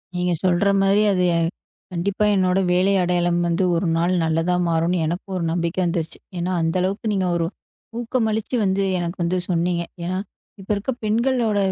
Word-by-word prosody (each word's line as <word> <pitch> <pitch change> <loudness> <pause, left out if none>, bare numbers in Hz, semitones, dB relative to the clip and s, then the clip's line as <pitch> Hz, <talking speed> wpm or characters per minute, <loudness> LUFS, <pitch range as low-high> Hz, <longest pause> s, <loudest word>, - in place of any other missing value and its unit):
நீங்கச் 180 -2 -1
சொல்ற 180 +2 +3
மாதிரி 195 +2 +4
அது 180 -1 +1
எ - - +2 0.5
கண்டிப்பா 190 +4 0
என்னோட 185 0 +2
வேலை 185 +2 +3
அடையாளம் 175 -1 +1
வந்து 170 +2 +1
ஒரு 170 +1 0
நாள் 175 +2 +1
நல்லதா 165 +2 +1
மாறும்னு 170 +2 +1
எனக்கும் 175 +4 -4
ஒரு 175 - -2
நம்பிக்கை 170 +1 -1
வந்துடுச்சு. 170 -2 -2 0.2
ஏன்னா 175 +2 -1
அந்த 165 +1 0
அளவுக்கு 195 +5 -2
நீங்க 190 -2 0
ஒரு 170 - 0 0.5
ஊக்கமளிச்சு 225 -1 -1
வந்து 195 0 +1
எனக்கு 175 +1 -3
வந்து 180 +2 0
சொன்னீங்க. 170 0 0 0.2
ஏன்னா 185 +2 -2 0.4
இப்ப 195 - -13
இருக்க 200 +6 -2
பெண்களோட 230 0 +1
180 Hz, 165 wpm, -22 LUFS, 170-200 Hz, 0.5 s, மாதிரி